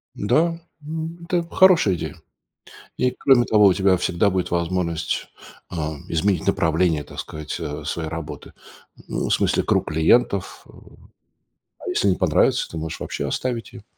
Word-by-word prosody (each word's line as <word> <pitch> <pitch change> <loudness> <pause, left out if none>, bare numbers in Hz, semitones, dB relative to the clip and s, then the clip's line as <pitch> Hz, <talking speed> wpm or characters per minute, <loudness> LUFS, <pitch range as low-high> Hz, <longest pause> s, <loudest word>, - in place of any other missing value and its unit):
Да, 160 +10 +1 0.2
м, 160 +2 -5
это 175 -1 0
хорошая 175 - +5
идея. - - -5 0.8
И, 125 0 +2
кроме 125 -1 +3
того, 105 -2 +5
у 95 - +5
тебя 95 -1 +3
всегда 90 +3 +1
будет 90 -1 -1
возможность, 85 -1 -1 0.4
а, 80 -3 -4
изменить 95 +4 0
направление, 80 -1 +2
так - - -13
сказать, 75 -1 -6
э, 75 0 -5
своей 80 -2 -3
работы. 80 -2 -7 0.6
Ну, - - -2
в - - 0
смысле, - - +1
круг - - +1
клиентов, 90 +5 +1
эм. - - -18 0.7
А - - -8
если 100 - +1
не 90 - +2
понравится, 90 -5 +2
ты 80 - -6
можешь 80 +1 -5
вообще - - -4
оставить 120 -3 -3
ее. 110 -3 -11
95 Hz, 155 wpm, -22 LUFS, 80-125 Hz, 0.8 s, хорошая